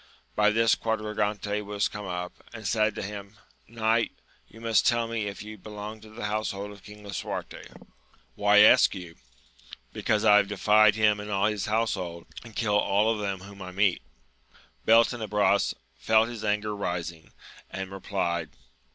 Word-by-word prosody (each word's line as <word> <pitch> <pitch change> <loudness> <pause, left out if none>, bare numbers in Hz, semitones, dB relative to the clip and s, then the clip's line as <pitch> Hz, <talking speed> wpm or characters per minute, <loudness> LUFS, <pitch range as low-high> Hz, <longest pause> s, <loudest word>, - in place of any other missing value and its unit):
By 105 0 +4
this 115 +1 +3
Quadragante 105 -2 -1
was 105 0 -1
come 105 -1 -7
up, 90 0 -4 0.2
and 110 -2 -9
said 110 0 +1
to - - -4
him. 100 +1 -8 0.3
Knight, 115 0 0 0.3
you 110 - -15
must 115 -1 +2
tell 120 -2 +2
me 115 -2 -2
if 100 0 -6
you 105 0 -10
be 105 - -11
long 105 +1 -7
to 110 - -13
the 110 0 -6
household 105 -1 -3
of 100 -1 -13
King 105 +1 -13
Lisuarte? 100 -2 -6 0.7
"Why 105 0 +5
ask 105 - +6
you 90 -3 -7
1 - - -20 0.3
— - - -19
Because 110 -1 0
I 105 -1 +7
have 105 - +3
defied 105 0 +4
him 105 -1 +3
and 105 0 -7
all 100 -1 +1
his 105 -1 -1
house 110 +1 +1
hold, 85 -3 -6 0.2
and 115 -2 -13
kill 105 -3 +2
all 105 +3 +2
of 110 - -5
them 100 -2 -3
whom 100 +1 -12
I 90 - -7
meet. 95 -1 +1 0.9
Beltenebros 110 -3 +3 0.2
felt 110 - +3
his 115 -3 -7
anger 105 0 -1
rising, 85 -4 -4 0.4
and 95 0 -6
replied. 85 -4 -2
105 Hz, 175 wpm, -27 LUFS, 100-110 Hz, 0.9 s, I